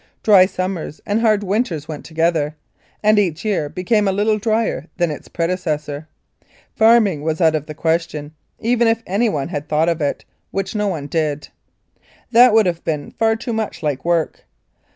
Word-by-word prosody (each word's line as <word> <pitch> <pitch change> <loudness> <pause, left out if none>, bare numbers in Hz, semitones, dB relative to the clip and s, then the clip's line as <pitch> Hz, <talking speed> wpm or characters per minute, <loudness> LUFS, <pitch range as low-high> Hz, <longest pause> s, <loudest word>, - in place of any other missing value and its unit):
Dry 195 -4 +6
summers 185 -5 -4
and 210 +2 0
hard 215 -3 +3
winters 190 - -1
went 155 -2 -7
together, 160 -2 0 0.5
and 215 0 +5
each 175 -2 -1
year 185 -9 0
became 205 +5 +1
a - - +3
little 210 +2 +1
drier 220 -6 -1
than 175 -3 +1
its 150 - -8
predecessor. 155 -4 -3 0.7
Farming 220 -8 +4
was 160 +1 -2
out 160 -3 +4
of 155 -1 -2
the 155 - -7
question, 160 -2 -2 0.3
even 235 +1 +2
if 225 0 +1
anyone 195 -8 0
had 150 -3 -5
thought 155 +2 +2
of 165 -1 -1
it, 145 - -2 0.2
which 195 0 -3
no 210 -1 0
one 160 -7 -3
did. 150 -1 -2 0.8
That 245 +1 +7
would 220 -1 +5
have 170 -2 -2
been 150 -3 -3
far 225 0 +1
too 230 +1 -4
much 220 -6 -3
like 145 -3 -1
work. 170 -2 -1
175 Hz, 175 wpm, -19 LUFS, 155-215 Hz, 0.8 s, That